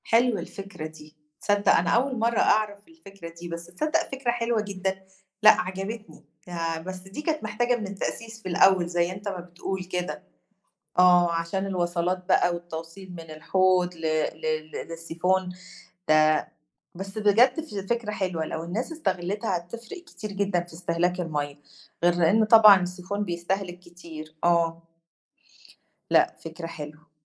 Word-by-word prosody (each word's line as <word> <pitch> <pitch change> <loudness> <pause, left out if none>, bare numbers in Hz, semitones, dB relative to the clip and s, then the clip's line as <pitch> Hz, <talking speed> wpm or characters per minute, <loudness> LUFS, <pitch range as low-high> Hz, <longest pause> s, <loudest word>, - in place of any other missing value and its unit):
حلوة 230 -1 +3
الفكرة 195 -5 -7
دي، 155 0 -15 0.3
تصدّق 205 0 +3
أنا - - +2
أول 255 0 +2
مرّه 230 0 +2
أعرف 210 -1 +2
الفكرة 195 - -12
دي، 175 - -6
بس 170 0 -6
تصدّق 305 - -1
فكرة 265 -3 -1
حلوة 235 -2 0
جدًا، 190 -1 -3 0.4
لأ، 215 - +8
عجبتني، 195 +4 -6 0.2
آآ، 165 -2 -2
بس 185 +2 -6
دي 190 +9 -8
كانت 310 -2 -1
محتاجة 240 +4 +1
من 215 -4 -4
التأسيس 225 +3 -5
في 185 - -4
الأول 185 0 +5
زي 175 0 +1
أنت 195 +2 -7
ما 190 -2 -3
بتقول 180 +2 -5
كده، 180 0 -4 0.8
آه، 180 -1 +6
عشان 170 +4 -1
الوصَلات 180 -1 -1
بقى 180 -1 +3
والتوصيل 170 +2 -8
من 165 -2 -9
الحوض 180 +3 +2
ل 165 - -13 0.3
ل 155 0 -3 0.2
للسيفون 170 +3 -1 0.6
ده 155 0 +4 0.5
بس 195 +4 -6
بجد 230 +7 +4
ف 310 -9 -10 0.2
فكرة 235 -2 0
حلوة، 185 -5 -2
لو 160 +1 -4
الناس 215 - -3
استغلّتها 205 - -1
هتفرِق 230 - -8
كتير 215 - -8
جدًا 195 -3 0
في 175 - -17
استهلاك 175 +1 0
المَيَّه، 145 -4 -3 0.5
غير 175 0 +5
لإن 175 +6 +4
طبعًا 215 -3 +9
السيفون 180 +3 -3
بيستهلك 175 +1 -3
كتير، 165 -3 -11
آه. 170 -1 +2 1.3
لأ، - - +4
فكرة 165 +1 -6
حلوة. 155 0 -9
185 Hz, 145 wpm, -26 LUFS, 170-210 Hz, 1.3 s, طبعًا